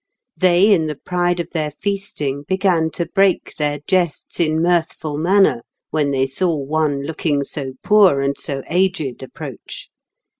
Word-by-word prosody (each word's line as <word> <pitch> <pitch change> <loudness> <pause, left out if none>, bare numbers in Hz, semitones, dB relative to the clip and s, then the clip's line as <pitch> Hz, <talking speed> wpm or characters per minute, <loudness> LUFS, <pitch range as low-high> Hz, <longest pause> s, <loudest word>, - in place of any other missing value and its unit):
They 185 +3 +4
in 160 -5 +2
the 150 - -3
pride 175 +3 -1
of 170 - -4
their 155 -3 -1
feasting 195 -4 -3
began 185 -4 +2
to 170 - -2
break 195 +2 +1
their 145 -1 -1
jests 180 -4 -1
in 160 -2 +2
mirthful 165 -3 0
manner, 170 -7 +3 0.3
when 150 -2 +1
they 135 -1 +1
saw 165 +6 0
one 145 0 -1
looking 145 -1 -1
so 135 -1 -6
poor 200 -9 +5
and 140 0 0
so 135 -1 -5
aged 175 -7 0
approach. 130 - -9
160 Hz, 150 wpm, -19 LUFS, 145-185 Hz, 0.3 s, poor